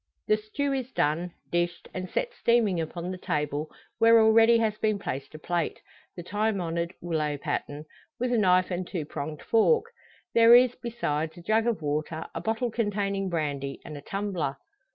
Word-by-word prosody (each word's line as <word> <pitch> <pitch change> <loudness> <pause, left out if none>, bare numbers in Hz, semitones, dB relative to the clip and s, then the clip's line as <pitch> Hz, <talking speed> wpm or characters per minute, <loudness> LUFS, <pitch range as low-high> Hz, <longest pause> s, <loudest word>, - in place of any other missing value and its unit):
The 215 - +4
stew 265 +7 -2
is 260 -1 -3
done, 165 +1 0 0.2
dished, 175 0 -1
and 185 -1 -5
set - - -2
steaming 225 - +2
upon 170 +3 -5
the 185 - -6
table, 150 -1 -2 0.3
where 230 0 +7
already 225 +1 +6
has 220 -2 +1
been 215 -1 +1
placed 140 -7 -5
a - - -5
plate 170 +1 -2 0.4
the 175 - -7
time 210 +2 0
honoured 170 +1 -2
willow 155 -4 -1
pattern 145 +1 -4 0.3
with 245 +1 0
a - - +3
knife 185 -2 +3
and 180 0 -2
two 170 -6 -4
pronged 150 +1 -6
fork. 430 - +3 0.5
There 230 +1 +8
is, 245 0 +6
besides, 160 -11 -3
a 175 - -11
jug 220 +5 +2
of 220 -9 -1
water, 155 +2 -2
a - - -4
bottle 225 +2 -1
containing 200 -3 -1
brandy, 145 -5 -2
and 150 - -7
a 145 - -8
tumbler. 185 -6 -3
185 Hz, 175 wpm, -27 LUFS, 155-225 Hz, 0.5 s, There